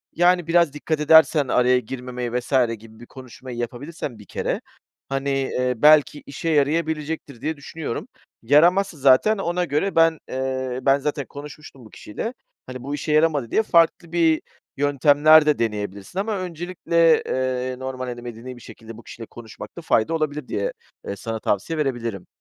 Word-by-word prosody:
yani, 175 Hz, -1 st, +3 dB
biraz 170 Hz, -3 st, +3 dB
dikkat 150 Hz, +1 st, -3 dB
edersen 150 Hz, -1 st, +5 dB
araya 125 Hz, 0 st, +3 dB
girmemeye." 125 Hz, 0 st, -6 dB
vs. 120 Hz, -, -12 dB, 0.3 s
gibi 110 Hz, 0 st, -16 dB
bir 120 Hz, -, -11 dB
konuşmayı 130 Hz, -1 st, -11 dB
yapabilirsen 120 Hz, +1 st, -6 dB
bir 105 Hz, -, -13 dB
kere, -, -, -3 dB, 0.5 s
hani, 135 Hz, +1 st, -2 dB
eee, 130 Hz, -2 st, 0 dB
belki 150 Hz, +1 st, +5 dB
işe 140 Hz, +4 st, -4 dB
yarayabilecektir, 155 Hz, -2 st, -1 dB
diye 155 Hz, +1 st, -3 dB
düşünüyorum. 145 Hz, -2 st, -6 dB, 0.4 s
Yaramazsa 170 Hz, +8 st, +3 dB
zaten 140 Hz, +11 st, +4 dB
ona 180 Hz, -1 st, -1 dB
göre 160 Hz, +6 st, -1 dB
ben 165 Hz, -1 st, +4 dB
eee, 130 Hz, -1 st, -3 dB
"Ben 135 Hz, +1 st, +4 dB
zaten 145 Hz, 0 st, -3 dB
konuşmuştum 145 Hz, -2 st, -11 dB
bu -, -, -14 dB
kişiyle, 165 Hz, -, -6 dB, 0.3 s
hani, 130 Hz, -1 st, -8 dB
bu 140 Hz, +2 st, -3 dB
işe 150 Hz, -, -4 dB
yaramadı." 150 Hz, -6 st, +2 dB
diye 220 Hz, -, +2 dB
farklı 170 Hz, -3 st, +2 dB
bir 165 Hz, -2 st, +2 dB, 0.4 s
yöntemler 145 Hz, +2 st, +5 dB
de 150 Hz, -1 st, +2 dB
deneyebilirsin 105 Hz, -, -3 dB
ama 210 Hz, +1 st, -1 dB
öncelikle, 170 Hz, -2 st, +1 dB
eee, 130 Hz, 0 st, -2 dB
normal, 130 Hz, -1 st, -5 dB
hani, 120 Hz, -1 st, -6 dB
medeni 120 Hz, +1 st, -8 dB
bir -, -, -14 dB
şekilde 115 Hz, 0 st, -12 dB
bu 115 Hz, -, -13 dB
kişiyle 115 Hz, -, -10 dB
konuşmakta 120 Hz, +8 st, -11 dB
fayda 135 Hz, -3 st, +1 dB
olabilir 150 Hz, -3 st, -2 dB
diye, 100 Hz, -, -2 dB, 0.3 s
eee, 100 Hz, -, -3 dB
sana 110 Hz, +2 st, -5 dB
tavsiye 110 Hz, +10 st, -1 dB
verebilirim. 120 Hz, -9 st, -3 dB
140 Hz, 160 wpm, -22 LUFS, 125-160 Hz, 0.5 s, edersen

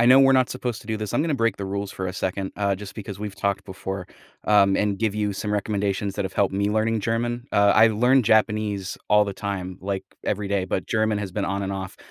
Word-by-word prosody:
I 120 Hz, -, +4 dB
know 130 Hz, +2 st, +8 dB
we're 135 Hz, 0 st, +6 dB
not 130 Hz, -1 st, +4 dB
supposed 125 Hz, -3 st, -3 dB
to -, -, -17 dB
do 110 Hz, 0 st, -1 dB
this, 105 Hz, -2 st, -4 dB
I'm -, -, +2 dB
gonna 155 Hz, -3 st, 0 dB
break 115 Hz, -5 st, +1 dB
the 100 Hz, -, -5 dB
rules 100 Hz, 0 st, -3 dB
for 95 Hz, -, -4 dB
a 90 Hz, -, -3 dB
second, 95 Hz, 0 st, -3 dB
uh, 100 Hz, -1 st, +1 dB
just 100 Hz, 0 st, -9 dB
because 100 Hz, -2 st, -7 dB
we've 105 Hz, -1 st, -5 dB
talked 100 Hz, -1 st, -1 dB
before, 95 Hz, -1 st, -6 dB, 0.4 s
um, 100 Hz, -2 st, +4 dB
and 105 Hz, -1 st, +1 dB
give 110 Hz, -3 st, +1 dB
you 105 Hz, -1 st, 0 dB
some 105 Hz, +2 st, -3 dB
recommendations 100 Hz, -1 st, -1 dB
that 100 Hz, -, -1 dB
have 95 Hz, -, -5 dB
helped 100 Hz, -1 st, +1 dB
me 100 Hz, +1 st, +1 dB
learning 110 Hz, +1 st, +1 dB
German, 120 Hz, +3 st, -1 dB
uh, 100 Hz, 0 st, +5 dB
I 110 Hz, +1 st, +7 dB
learn 125 Hz, +5 st, +4 dB
Japanese 105 Hz, -3 st, +1 dB
all 105 Hz, 0 st, +5 dB
the 100 Hz, -, -4 dB
time, 95 Hz, -3 st, -4 dB
like, 95 Hz, 0 st, -3 dB, 0.2 s
every 105 Hz, 0 st, -1 dB
day, 100 Hz, -2 st, 0 dB
but 90 Hz, -, -2 dB
German 110 Hz, -1 st, +1 dB
has 100 Hz, -3 st, -5 dB
been 100 Hz, +1 st, -1 dB
on 100 Hz, 0 st, -2 dB
and 95 Hz, -, -3 dB
off. 95 Hz, -1 st, -5 dB
100 Hz, 255 wpm, -24 LUFS, 100-110 Hz, 0.4 s, know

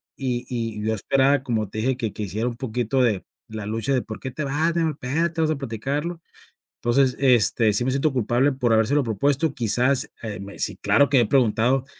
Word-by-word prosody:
y 125 Hz, -2 st, -3 dB
y 115 Hz, -4 st, -4 dB
yo 110 Hz, -, +1 dB
esperaba, 135 Hz, +6 st, +2 dB
como 110 Hz, -6 st, -2 dB
te 110 Hz, -, -5 dB
dije, 125 Hz, +3 st, 0 dB
que 115 Hz, -5 st, -3 dB
que 105 Hz, -, -5 dB
hiciera 105 Hz, +4 st, -2 dB
un 120 Hz, -, -3 dB
poquito 125 Hz, +1 st, -1 dB
de 110 Hz, -6 st, +1 dB, 0.2 s
la 110 Hz, -2 st, -6 dB
lucha 115 Hz, +6 st, -1 dB
de: 125 Hz, -, 0 dB
"¿Por 110 Hz, -, -8 dB
qué 130 Hz, -, -5 dB
te 135 Hz, +4 st, -5 dB
vas, 155 Hz, +5 st, 0 dB
mi 170 Hz, -, +1 dB
amor? 160 Hz, -1 st, 0 dB
Espérate, 165 Hz, +6 st, -1 dB
vamos 155 Hz, -1 st, +2 dB
a -, -, -8 dB
platicarlo". 140 Hz, +7 st, -4 dB, 0.6 s
Entonces, 130 Hz, +2 st, +2 dB
este, 120 Hz, -4 st, +4 dB
sí 115 Hz, +4 st, +1 dB
me 130 Hz, -, +1 dB
siento 140 Hz, +3 st, +1 dB
culpable 125 Hz, +2 st, +1 dB
por 125 Hz, -3 st, +1 dB
habérselo 120 Hz, +6 st, +2 dB
propuesto, 140 Hz, +7 st, 0 dB
quizás, 125 Hz, +2 st, +1 dB
eh 105 Hz, -4 st, -4 dB
me 100 Hz, +1 st, -9 dB
sí, -, -, -1 dB
claro 140 Hz, -1 st, +3 dB
que 135 Hz, -, +3 dB
me 120 Hz, -, +5 dB
he -, -, -2 dB
preguntado: 125 Hz, +1 st, +2 dB
125 Hz, 220 wpm, -23 LUFS, 110-140 Hz, 0.6 s, me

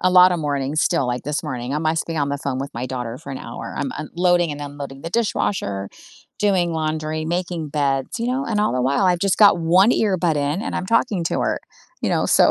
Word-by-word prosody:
a 185 Hz, -, +3 dB
lotta 180 Hz, 0 st, +7 dB
mornings 145 Hz, -1 st, -1 dB
still, 165 Hz, -7 st, +1 dB
like, 125 Hz, 0 st, -2 dB
this 150 Hz, +3 st, -2 dB
morning, 130 Hz, -3 st, -4 dB
I -, -, +1 dB
must 160 Hz, +1 st, 0 dB
have -, -, -21 dB
been 155 Hz, -, -1 dB
on 140 Hz, -, +1 dB
the 140 Hz, 0 st, -2 dB
phone 135 Hz, -2 st, -3 dB
with 140 Hz, +1 st, -4 dB
my 120 Hz, +2 st, -3 dB
daughter 125 Hz, -2 st, -4 dB
for 140 Hz, -3 st, -10 dB
an 135 Hz, -, -5 dB
hour, -, -, -7 dB
I'm -, -, -1 dB
unloading 175 Hz, -1 st, +1 dB
and 145 Hz, -, -7 dB
unloading 140 Hz, -1 st, -7 dB
the 165 Hz, -, -5 dB
dishwasher, 180 Hz, -, -1 dB, 0.5 s
doing 185 Hz, -5 st, +2 dB
laundry, 155 Hz, 0 st, -2 dB
making 175 Hz, -1 st, -2 dB
beds, 140 Hz, -, -1 dB
you 230 Hz, -, -2 dB
know, 260 Hz, +2 st, 0 dB
and 210 Hz, -2 st, 0 dB
all 210 Hz, -, +2 dB
the 125 Hz, -, 0 dB
while 140 Hz, +9 st, +2 dB
I've 180 Hz, -1 st, +3 dB
just 195 Hz, -2 st, +1 dB
got 200 Hz, -4 st, +7 dB
1 180 Hz, +7 st, +4 dB
earbud 185 Hz, -8 st, +2 dB
in 145 Hz, +7 st, -1 dB
and -, -, -4 dB
I'm 185 Hz, -, -2 dB
talking 215 Hz, -4 st, +1 dB
to -, -, -1 dB
her, -, -, 0 dB, 0.4 s
you -, -, +1 dB
know, -, -, +1 dB
so -, -, +5 dB
155 Hz, 240 wpm, -21 LUFS, 140-180 Hz, 0.5 s, lotta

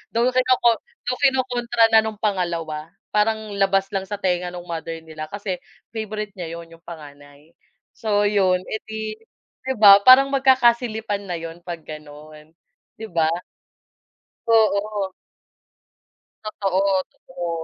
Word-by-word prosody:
Though 240 Hz, +2 st, +3 dB
kinoko 250 Hz, -2 st, +3 dB, 0.2 s
though 250 Hz, +1 st, -3 dB
kinokontra 245 Hz, -4 st, +2 dB
na 220 Hz, -, +7 dB
no'ng 220 Hz, 0 st, -2 dB
pangalawa, 170 Hz, -6 st, -2 dB, 0.2 s
parang 215 Hz, 0 st, 0 dB
labas 195 Hz, 0 st, +2 dB
lang 195 Hz, -1 st, -3 dB
sa 205 Hz, -, -3 dB
tenga 180 Hz, -3 st, -1 dB
no'ng 175 Hz, 0 st, -7 dB
mother 165 Hz, 0 st, -5 dB
nila 155 Hz, -1 st, -8 dB
kasi 200 Hz, 0 st, -5 dB, 0.3 s
favorite 215 Hz, -2 st, -5 dB
niya 165 Hz, -1 st, -5 dB
'yon, 170 Hz, 0 st, -11 dB
'yong 165 Hz, 0 st, -17 dB
panganay. 145 Hz, -1 st, -13 dB, 0.4 s
So 210 Hz, -4 st, 0 dB
'yon, 190 Hz, -3 st, +2 dB
edi 220 Hz, 0 st, -6 dB, 0.5 s
di 265 Hz, -, +1 dB
ba? 205 Hz, -3 st, +9 dB
Parang 270 Hz, +2 st, +8 dB
magkakasilipan 235 Hz, -6 st, +2 dB
na 175 Hz, -, -3 dB
'yon 165 Hz, +1 st, -7 dB
'pag 170 Hz, -2 st, -6 dB
gano'n. 155 Hz, +1 st, -12 dB, 0.4 s
'Di 220 Hz, -, -8 dB
ba? 165 Hz, -2 st, +2 dB, 1.2 s
Oo. 210 Hz, -3 st, +2 dB, 1.3 s
Totoo, 195 Hz, -3 st, -1 dB, 0.3 s
totoo. 175 Hz, -1 st, -7 dB
200 Hz, 125 wpm, -22 LUFS, 170-220 Hz, 1.3 s, ba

